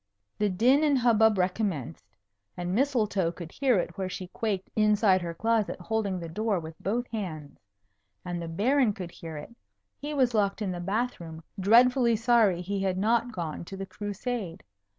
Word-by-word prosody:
The 210 -1 +2
din 250 +10 +3
and 290 -3 +3
hubbub 220 -3 +4
recommenced. 180 - -2 0.5
And 180 0 -3
Mistletoe 215 -8 +1
could 170 -1 -9
hear 260 -5 +2
it 175 0 -3
where 190 -1 -2
she 185 -1 -6
quaked 200 -2 -3
inside 210 -3 +4
her 170 -1 -5
closet 225 0 0
holding 200 0 -1
the 170 - -6
door 210 +3 -1
with 160 0 -8
both 235 +5 -1
hands. 160 -10 -6 0.7
And 175 -1 -3
the 170 - -5
Baron 230 +7 +2
could 180 -3 -7
hear 165 -3 -8
it. 150 +11 -10 0.4
He 295 +1 -4
was 255 -3 +2
locked 200 -2 +1
in 205 -4 -2
the 175 - -4
bath 215 +8 -2
room, 160 -1 -9 0.2
dreadfully 235 +4 +5
sorry 225 -5 +3
he 200 +2 -2
had 190 -1 0
not 230 +4 +1
gone 170 -7 -5
to 195 - -8
the 195 - -4
Crusade. 205 -2 -5
200 Hz, 175 wpm, -28 LUFS, 175-230 Hz, 0.7 s, dreadfully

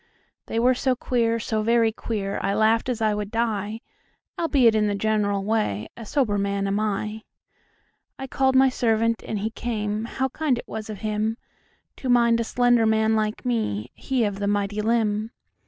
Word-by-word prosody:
They - - -3
were 245 +2 +4
so 255 +1 0
queer, 235 -2 0
so 220 0 -1
very 230 0 +3
queer,I 200 -3 -3
laughed 220 +3 +2
as 230 -3 -1
I 215 -1 +2
would 210 -1 -3
die; 220 -1 -2 0.5
Albeit, 275 -9 +3
in 215 -1 +2
the 205 - 0
general 205 -1 0
way,A 215 - -2
sober 220 -8 +1
man 200 0 -1
am 200 +1 0
I.I 215 +5 -7
called 265 0 +1
my 265 +1 +6
servant, 230 -2 +1
and 215 - -3
he 215 +3 -2
came; 215 -2 -3
How 265 +3 -2
kind 285 -2 0
it - - -8
was 220 0 -6
of 210 -3 -7
himTo 215 0 -1 0.7
mind 235 -1 +4
a - - +1
slender 245 -1 +3
man 220 0 +2
like 215 +3 -2
me, 125 - -1
He 260 -3 -1
of 205 -2 -2
the 200 - -1
mighty 205 +1 0
limb. 215 -1 0
220 Hz, 170 wpm, -24 LUFS, 210-235 Hz, 0.7 s, my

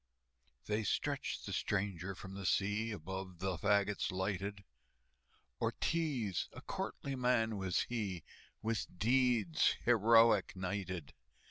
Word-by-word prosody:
They 105 +1 0
stretched 100 - -1
the - - -4
stranger 95 -2 -1
from 95 +1 -9
the 100 -1 -4
sea, 105 +4 +1
Above 95 -1 -6
the 95 +1 -1
fagots 100 -2 +2
lighted, 100 +2 -2 1.0
Ortiz, 135 - 0
a - - -9
courtly 140 - -4
man 125 -3 +2
was 95 -3 0
he, 100 -8 -3 0.4
With 115 0 -1
deeds 115 -5 +3
heroic 115 -3 +5
knighted. 95 -4 -4
100 Hz, 110 wpm, -35 LUFS, 95-115 Hz, 1.0 s, heroic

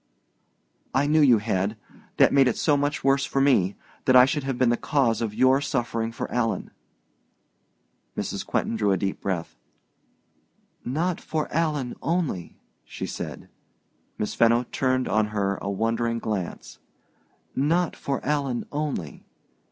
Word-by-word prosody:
"I 135 +2 +3
knew 155 +2 +3
you 125 -6 +6
had. 105 0 -1 0.4
That - - +5
made 135 -2 +5
it 125 - 0
so 150 - +3
much 145 +2 -1
worse 135 0 +3
for 135 - -1
me 125 -9 +3 0.3
that 130 -2 +4
I 125 0 +9
should 145 +2 -1
have 135 -2 -2
been 125 -1 +3
the - - +3
cause 120 -4 +1
of 110 -2 -2
your 130 +3 +4
suffering 115 -5 -1
for 115 - -5
Alan!" 120 -2 -1 1.5
Mrs. - - -3
Quentin - - -1
drew 105 -2 +1
a 95 - +2
deep 95 +2 -3
breath. 90 -8 -3 1.3
"Not 165 +7 -1
for 155 -1 -2
Alan 150 -6 0
only," 160 - -2 0.3
she - - -6
said. - - -6 0.7
Miss 105 - -2
Fenno 115 +1 +4
turned 130 -1 +1
on 110 0 +2
her 100 -2 -1
a 100 - -3
wondering 115 +3 0
glance. 105 -6 -4 0.8
"Not 165 +5 +1
for 140 -1 -3
Alan 140 -4 -1
only. 145 - -4
125 Hz, 145 wpm, -25 LUFS, 110-145 Hz, 1.5 s, I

